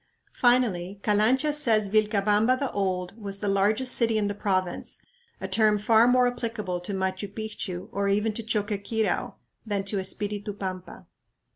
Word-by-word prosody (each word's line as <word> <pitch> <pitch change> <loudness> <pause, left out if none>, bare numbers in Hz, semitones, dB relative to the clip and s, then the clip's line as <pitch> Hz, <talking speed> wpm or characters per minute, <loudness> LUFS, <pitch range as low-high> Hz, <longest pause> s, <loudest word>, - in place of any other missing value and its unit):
Finally 205 -7 +1
Calancha 245 +8 +2
says 225 -8 +2
"Vilcabamba 210 +3 +2
the 275 -1 -2
Old" 185 -1 -2
was 200 -1 -4
"the 205 - -4
largest 210 +6 +2
city" 230 -2 +3
in 210 -1 +1
the 205 - -2
province, 185 -3 -2 0.4
a 190 - -4
term 210 +2 +3
far 225 +2 +4
more 250 0 +4
applicable 230 -7 -3
to 175 +3 -6
Machu 190 +1 -2
Picchu 205 -4 -5
or 200 0 -1
even 210 +2 +1
to 230 - -4
Choqquequirau 215 0 -1 0.3
than 205 -3 -2
to 200 0 -1
Espiritu 205 +2 -3
Pampa. 185 -2 -7
210 Hz, 150 wpm, -26 LUFS, 195-225 Hz, 0.4 s, far